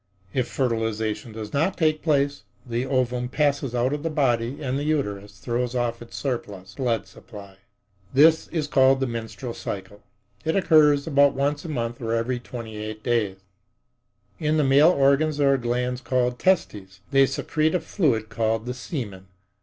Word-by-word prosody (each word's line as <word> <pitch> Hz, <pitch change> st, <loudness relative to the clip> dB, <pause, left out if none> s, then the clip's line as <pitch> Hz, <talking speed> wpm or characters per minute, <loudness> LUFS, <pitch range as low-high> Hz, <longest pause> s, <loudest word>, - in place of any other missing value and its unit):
If 130 Hz, -2 st, 0 dB
fertilization 110 Hz, -2 st, -2 dB
does 110 Hz, -1 st, -7 dB
not 165 Hz, +7 st, +1 dB
take 155 Hz, -2 st, +1 dB
place, 145 Hz, -2 st, +1 dB, 0.2 s
the 120 Hz, +1 st, -2 dB
ovum 125 Hz, -2 st, 0 dB
passes 140 Hz, -3 st, 0 dB
out 125 Hz, +3 st, +1 dB
of 145 Hz, -, -3 dB
the 165 Hz, -, -2 dB
body 130 Hz, -4 st, 0 dB
and 130 Hz, -3 st, -2 dB
the -, -, -3 dB
uterus 105 Hz, -9 st, -2 dB
throws 125 Hz, 0 st, -2 dB
off 120 Hz, -1 st, -1 dB
its 120 Hz, -, -9 dB
surplus 105 Hz, -8 st, -4 dB
blood 120 Hz, -4 st, -1 dB
supply. 100 Hz, -4 st, -13 dB, 0.5 s
This 155 Hz, +4 st, +5 dB
is 160 Hz, -3 st, -2 dB
called 135 Hz, -2 st, +4 dB
the 135 Hz, -, +1 dB
menstrual 115 Hz, 0 st, -5 dB
period. 100 Hz, -1 st, -6 dB, 0.4 s
It 160 Hz, 0 st, 0 dB
occurs 150 Hz, -6 st, +4 dB
about 140 Hz, -2 st, +4 dB
once 145 Hz, +3 st, -1 dB
a -, -, -5 dB
month 120 Hz, -4 st, -3 dB
or 115 Hz, -1 st, -2 dB
every 120 Hz, +2 st, -1 dB
twenty 115 Hz, -3 st, -8 dB
eight 110 Hz, 0 st, -6 dB
days.In 105 Hz, -, -4 dB
the 150 Hz, -, +3 dB
male 140 Hz, +4 st, +6 dB
organs 145 Hz, -1 st, +3 dB
there 140 Hz, -1 st, +4 dB
are -, -, +2 dB
glands 125 Hz, +1 st, -1 dB
called 125 Hz, 0 st, 0 dB
testes. 100 Hz, -, 0 dB
They 135 Hz, 0 st, +5 dB
secrete 155 Hz, +4 st, 0 dB
a -, -, +2 dB
fluid 125 Hz, -, 0 dB
called 115 Hz, -1 st, -1 dB
the 125 Hz, -, -3 dB
semen. 110 Hz, -, -6 dB
125 Hz, 165 wpm, -24 LUFS, 115-145 Hz, 0.5 s, male